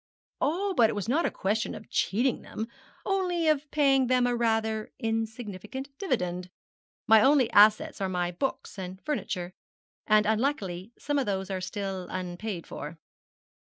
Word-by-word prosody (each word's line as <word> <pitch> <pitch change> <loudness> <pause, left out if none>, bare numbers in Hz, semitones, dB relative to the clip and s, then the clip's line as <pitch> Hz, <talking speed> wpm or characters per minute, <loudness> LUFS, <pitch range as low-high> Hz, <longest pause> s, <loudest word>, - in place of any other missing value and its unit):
'Oh, 380 +7 +1
but 230 -5 +5
it - - -1
was 205 0 -3
not 295 +8 +2
a - - 0
question 210 +3 -1
of 220 - -10
cheating 240 +5 +1
them, 220 - -5 0.4
only 360 -4 +1
of 300 -1 +2
paying 275 -3 +3
them 250 0 +3
a 245 0 +1
rather 220 -2 0
insignificant 225 +2 -4
dividend. 180 - -1 0.6
My 220 -2 +7
only 270 -1 +4
assets 210 0 +5
are 190 - 0
my 180 -1 -1
books 200 +1 -3
and 185 0 -6
furniture, 185 -10 -3 0.5
and 215 0 +5
unluckily 215 -4 -1
some 290 -1 -1
of 265 - -1
those 190 -1 -2
are 190 -1 -2
still 195 -1 -4
unpaid 180 +1 -4
for.' 155 +3 -7
220 Hz, 155 wpm, -28 LUFS, 190-270 Hz, 0.6 s, My